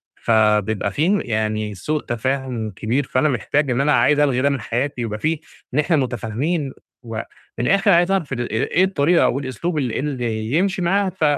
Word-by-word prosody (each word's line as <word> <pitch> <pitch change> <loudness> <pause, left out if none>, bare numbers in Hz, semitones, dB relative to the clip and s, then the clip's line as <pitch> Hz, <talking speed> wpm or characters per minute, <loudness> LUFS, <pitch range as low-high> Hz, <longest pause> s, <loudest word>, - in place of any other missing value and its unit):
فبيبقى 105 -2 +2
فيه 180 - +2
يعني 110 -2 -2
سوء 150 - -2
تفاهم 120 -2 -2
كبير، 115 +9 -1
فأنا 130 +3 +1
محتاج 140 +2 0
إن 125 +3 +1
أنا 150 +1 +2
عايز 135 +5 +4
ألغي 135 -4 +2
ده 140 - +3
من 140 -4 -2
حياتي، 125 +4 -2
يبقى 110 -2 -3
فيه 155 +4 0 0.3
إن 150 - +2
إحنا 160 +2 +2
متفاهمين، 130 - -1 0.3
و 115 -1 -7 0.4
من 120 - 0
الآخر 195 +1 +4
عايز 175 +1 +4
أعرف 175 -8 0
ال 120 -1 -3
إيه 125 +10 +1
الطريقة 175 -3 +3
أو 135 - +1
الأسلوب 140 +5 -3
اللي 130 -6 -1
اللي 120 -6 -3
يمشي 190 +2 +1
معاها، 195 +3 +2
ف 185 -3 -5
135 Hz, 185 wpm, -21 LUFS, 115-155 Hz, 0.4 s, عايز